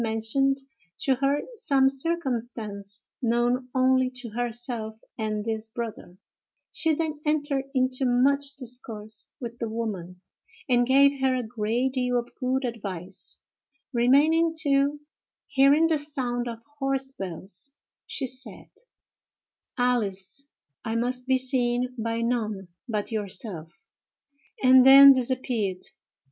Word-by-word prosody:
mentioned 230 +5 +1 0.4
to 270 - +1
her 275 +3 +1
some 275 - +2
circumstance 240 -9 -3 0.2
known 240 +1 +1
only 260 0 +3
to 250 -2 -6
herself 235 -1 -4 0.2
and 215 -2 -3
this 220 -1 -3
brother; 220 -5 -7 0.5
she 320 - +4
then 320 0 -1
entered 290 -3 0
into 255 +1 +1
much 275 +3 +2
discourse 230 -4 -4
with 235 -1 -7
the 230 - -3
woman, 200 -6 -5 0.5
and 245 -2 +3
gave 275 +1 +5
her 260 -1 +2
a 250 - -1
great 230 +3 -1
deal 250 -1 0
of 240 0 -4
good 260 +1 -1
advice, 200 -7 -5 0.6
remaining 295 +7 +4
till, 285 -2 +3 0.5
hearing 285 +3 +4
the 320 -2 +2
sound 255 -5 -3
of 230 -1 -7 0.2
horse 270 -1 -1
bells, 195 - -6 0.3
she - - -2
said: 255 +1 -1 1.1
"Alice, 245 0 -1 0.4
I 225 - -3
must 250 +2 -1
be 260 0 +4
seen 250 -1 +1
by 230 -1 -2
none 215 -6 -2 0.2
but 210 0 -2
yourself," 185 -5 -4 0.8
and 255 0 +8
then 275 +1 +10
disappeared. 245 -7 -1
245 Hz, 120 wpm, -26 LUFS, 225-270 Hz, 1.1 s, then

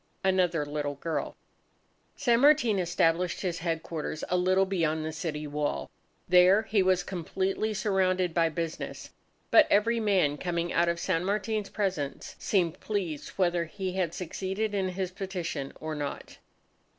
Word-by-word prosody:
Another 180 -5 +2
Little 145 -1 -3
Girl 160 +3 -3 0.8
San 240 -4 +2
Martin 270 -7 +5
established 175 0 +1
his 175 -3 -2
headquarters 165 -2 -3
a 180 - +1
little 185 +2 +3
beyond 160 -5 0
the 160 - -3
city 155 -1 -4
wall. 145 - -2 0.4
There 180 +4 +6
he 220 -2 +2
was 185 -1 +2
completely 190 +4 -2
surrounded 185 -4 +1
by 165 -1 +3
business. 165 0 -5 0.4
But - - +7
every 230 +3 +3
man 185 -9 +2
coming 170 -1 -2
out 170 +1 +3
of 170 0 -1
San 175 -1 0
Martin's 210 +1 -1
presence, 180 -10 -3
seemed 175 -5 0
pleased 180 -9 -3
whether 175 -2 +2
he 190 +3 -4
had 180 -3 -1
succeeded 195 +4 -3
in 190 -2 0
his 185 0 -3
petition 185 -7 -4
or 155 0 -4
not. 145 -2 -6
180 Hz, 145 wpm, -28 LUFS, 165-195 Hz, 0.8 s, But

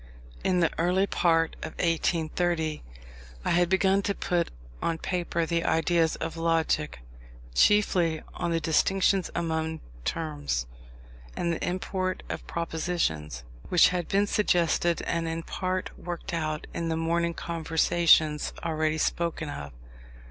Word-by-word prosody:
In 180 -1 +2
the 165 - +3
early 180 +3 +3
part 165 -4 +2
of - - -5
1830 165 -1 0 0.6
I - - +1
had 175 0 +3
begun 190 +1 +3
to 200 0 -1
put 175 -2 0 0.3
on 165 - 0
paper 170 -1 -1
the 170 0 0
ideas 165 0 +2
on 165 - -2
Logic 165 -2 +1 0.6
(chiefly 175 - +3
on 170 - -2
the 165 -1 +1
distinctions 185 +4 +2
among 160 -1 -1 0.2
Terms, 145 - -2 0.7
and 170 -1 0
the - - -4
import 185 +1 -2
of - - -5
Propositions) 160 - -2 0.3
which 180 0 +6
had 180 -1 -2
been 200 +1 +2
suggested 175 -4 +2
and 165 0 -1
in 165 0 -3
part 185 +1 -2
worked 175 -1 -5
out 155 -2 -2
in 165 -1 -2
the 160 - 0
morning 170 +1 0
conversations 160 -2 +2
already 155 -1 0
spoken 165 -1 -1
of. 70 - -6
170 Hz, 130 wpm, -27 LUFS, 160-175 Hz, 0.7 s, which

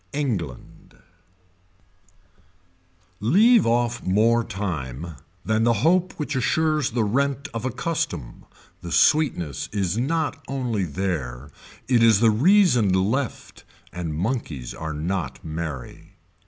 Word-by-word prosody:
ENGLAND 105 - -4 2.2
Leave 205 - +5
off 120 +1 +1
more 115 +5 +2
time 85 - -5 0.3
than 110 +1 +1
the 120 0 +4
hope 180 +2 +3
which 150 -4 -4
assures 155 +3 +1
the 115 -1 0
rent 140 +5 0
of 115 +1 -4
a - - +1
custom, 125 - -4 0.4
the 85 - -7
sweetness 90 - +2
is 100 0 -1
not 155 +4 -1
only 125 -8 -2
there 75 -7 -4 0.4
it 120 -2 +3
is 115 -3 +5
the 115 0 +5
reason 130 - +4
left 110 +8 -2 0.3
and 85 -3 -4
monkeys 85 - -3
are 80 -1 -5
not 90 +5 -3
merry. 80 -5 -6
110 Hz, 115 wpm, -23 LUFS, 85-135 Hz, 2.2 s, Leave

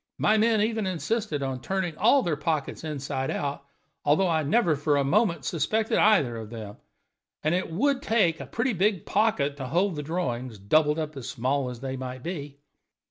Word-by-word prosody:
My 215 - +3
men 220 0 +3
even 220 -2 0
insisted 185 -3 -2
on 130 -2 -3
turning 190 -2 -2
all 240 - +4
their 165 -3 0
pockets 150 0 -2
inside 135 -3 -3
out, 140 -1 -3 0.4
although 155 +6 +3
I 160 -2 +2
never 170 +1 +2
for 145 0 +1
a 140 - +2
moment 170 - +1
suspected 215 - 0
either 165 - +4
of 110 -2 -7
them, 110 -3 -8 0.7
and 155 +2 +2
it 185 +1 -1
would 270 - +1
take 195 - +2
a - - -7
pretty 245 +1 -1
big 195 0 +1
pocket 160 -10 +1
to 135 -2 -5
hold 180 +6 +1
the 150 - -3
drawings, 130 -7 -3
doubled 150 +10 +2
up 155 -1 -3
as 130 -2 -6
small 130 +1 -1
as 125 -1 -8
they 135 -1 -4
might 130 0 -6
be." 145 -5 -5
155 Hz, 190 wpm, -26 LUFS, 135-200 Hz, 0.7 s, all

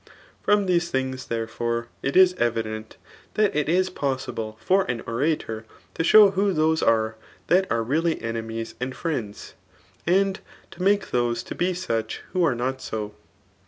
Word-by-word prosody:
Fh>m 205 -1 +4
Aese 175 -1 +2
tfafligs, 130 -2 -2
therefore, 115 +1 -2
it 135 +5 0
is 185 -1 +7
evident, 110 -2 -2 0.4
that 210 -5 +2
itis 175 +5 +2
possible 130 -8 -3
(%ran 185 -12 +1
nntor] 115 -3 -1 0.3
to - - -1
show 205 +3 +8
who 195 0 +1
those 160 0 +2
are 110 -1 +2 0.3
that 185 +2 +2
are 115 -1 +1
teaHy 160 +6 +1
emniea 115 0 -4
and 130 +1 -3
friends, 125 -12 -4 0.5
^nd 195 +2 +3 0.3
tamake 195 +3 +1
those 120 -1 0
to - - -6
be 180 +1 0
such 115 -11 -3
ifiho 185 - +1
are 145 -7 +3
not 130 +2 -2
so. 105 -1 -4
130 Hz, 145 wpm, -24 LUFS, 115-180 Hz, 0.5 s, show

